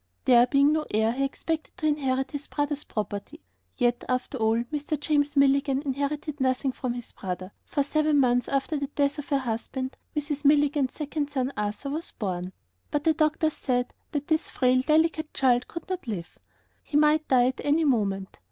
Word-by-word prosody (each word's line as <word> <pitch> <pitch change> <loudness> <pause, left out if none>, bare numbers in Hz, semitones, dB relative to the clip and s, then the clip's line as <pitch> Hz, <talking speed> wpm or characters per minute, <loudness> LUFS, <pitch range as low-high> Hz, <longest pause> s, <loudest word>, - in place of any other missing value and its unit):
There 245 -1 +6
being 280 +3 +4
no 310 0 +1
heir, 220 +1 +2
he 265 +3 -1
expected 315 +5 -3
to 330 - -3
inherit 270 -3 0
his 290 -1 -5
brother's 290 0 -2
property. 210 +7 -5 0.4
Yet, 240 -1 +1
after 255 +1 -1
all, 225 +1 +2
Mr. 295 0 -2
James 290 -1 +1
Milligan 275 0 +3
inherited 285 +1 -3
nothing 260 +1 +1
from 250 -1 -3
his 240 -1 -7
brother, 185 0 -5
for 285 - 0
seven 305 +1 +2
months 245 -2 +3
after 275 +3 0
the 280 -1 -2
death 285 +1 0
of 290 - -7
her 280 - +3
husband, 260 +1 -3 0.2
Mrs. 295 0 -2
Milligan's 285 -2 +3
second 295 -1 -3
son, 270 -1 -1
Arthur, 210 +7 -3
was 315 +3 -3
born. 185 -4 -4 0.4
But 295 - -1
the 320 - +4
doctors 310 0 +1
said 245 -1 -1 0.2
that 290 -1 -3
this 315 -1 +1
frail, 255 0 +3
delicate 315 +2 +1
child 250 -2 +3
could 335 - -8
not 370 -6 -4
live. 185 -7 -5 0.4
He 290 - -1
might 305 +1 +4
die 250 -2 +5
at 260 - -5
any 300 +3 +3
moment. 200 - 0
275 Hz, 180 wpm, -27 LUFS, 250-300 Hz, 0.4 s, There